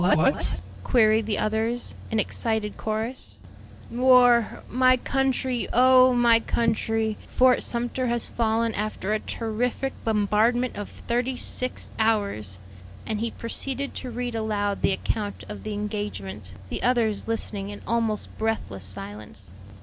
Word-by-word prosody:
"What?" 155 - +2 0.2
queried 220 - +3
the 210 - 0
others, 220 +3 -1
in 220 - 0
excited 220 0 -1
chorus. 220 +4 -4 0.5
"War! 245 -2 +4
My 255 +1 +4
country! 260 -1 0
oh, 255 +1 +6
my 235 -1 +5
country! 225 -1 0
Fort 255 0 +4
Sumter 245 +2 -2
has 235 -1 0
fallen 225 0 0
after 210 -1 -2
a 215 - +1
terrific 240 +5 -2
bombardment 225 +3 +2
of 205 - -5
thirty 245 +2 -2
six 255 0 -3
hours." 200 - 0 0.5
And 215 - -2
he 230 +1 -1
proceeded 270 +4 -3
to 255 - -6
read 245 0 -3
aloud 210 -2 -1
the - - +3
account 205 +1 -2
of 210 - -7
the 215 - -4
engagement, 205 - -5 0.2
the - - -3
others 230 -5 +1
listening 205 -3 -3
in 205 - -9
almost 225 -2 -1
breathless 220 - -2
silence. 100 0 -7
225 Hz, 130 wpm, -25 LUFS, 210-245 Hz, 0.5 s, oh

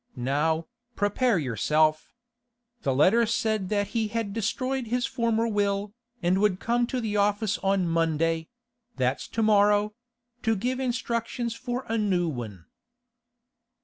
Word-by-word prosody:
Now, 150 +6 0 0.3
prepare 205 +2 +2
yourself. 155 +4 +1 0.7
The 135 - 0
letter 215 - +4
said 220 -4 0
that 205 -1 0
he 225 -2 0
had 215 -2 -3
destroyed 255 +4 -2
his 245 +2 0
former 230 -2 0
will, 205 -1 0 0.3
and 185 +3 +2
would 205 -3 +2
come 240 +2 +1
to 255 - -2
the 215 -3 -2
office 205 0 +1
on 195 -2 +1
Monday—that's 165 - -2
to 225 - -1
morrow—to 225 +3 +1
give 250 +6 -2
instructions 235 -1 -2
for 245 +2 -4
a 225 0 0
new 185 -5 +1
one. 110 - -6
210 Hz, 125 wpm, -26 LUFS, 175-235 Hz, 0.7 s, letter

